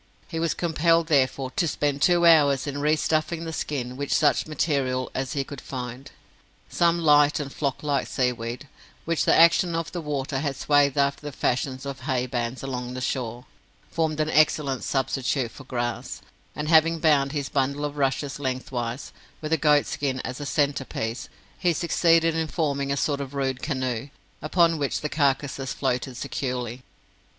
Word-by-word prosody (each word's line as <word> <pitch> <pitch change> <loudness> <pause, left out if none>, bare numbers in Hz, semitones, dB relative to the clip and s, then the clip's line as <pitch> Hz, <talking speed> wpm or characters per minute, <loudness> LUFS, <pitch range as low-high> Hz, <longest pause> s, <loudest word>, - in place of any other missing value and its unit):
He 165 - -3
was 165 -1 0
compelled, 165 0 +2
therefore, 135 -2 +2
to 170 - 0
spend 145 -1 -1
two 175 -1 +4
hours 145 -5 +5
in 145 -1 -4
re 150 +1 +3
stuffing 160 +2 -1
the 160 - -5
skin 125 -6 -3
with 140 +1 -4
such 150 - +3
material 140 -4 -1
as 130 +1 -3
he 140 -2 -1
could 140 -1 -9
find. 125 0 -7 0.6
Some 170 0 +2
light 150 -3 +4
and 140 -2 -5
flock 140 -1 -2
like 145 -2 0
seaweed, 125 0 -2 0.4
which 165 -1 0
the - - +4
action 170 +1 +5
of 165 -2 -3
the 175 - -4
water 140 -2 -2
had 140 -1 -2
swathed 145 0 +2
after 140 0 +1
the 145 -1 -6
fashion 130 0 -1
of 140 -1 -5
haybands 125 -2 -2
along 125 -2 -4
the - - -4
shore, 125 -1 -3 0.5
formed 160 -2 -1
an 155 0 0
excellent 150 -4 +2
substitute 135 -2 -1
for 135 - -12
grass, 120 -2 -4 0.3
and, 150 - -3
having 165 +1 +5
bound 150 -4 +3
his 145 -2 -2
bundle 140 +2 0
of 145 0 -4
rushes 140 0 -1
lengthwise, 130 -2 -4 0.3
with 155 0 -5
the 160 - +4
goat 150 -1 +4
skin 135 -2 -2
as 130 +3 -6
a 145 - -4
centre 145 -2 +1
piece, 115 -1 -4 0.3
he 175 -2 +2
succeeded 165 0 +3
in 160 -1 0
forming 140 -4 -1
a 140 - 0
sort 140 +1 0
of 140 0 -7
rude 135 -2 -1
canoe, 130 -3 -2 0.3
upon 165 +1 +2
which 140 -2 -1
the 150 - -2
carcases 140 -2 0
floated 130 -1 -2
securely. 125 -1 -4
140 Hz, 175 wpm, -25 LUFS, 130-155 Hz, 0.6 s, hours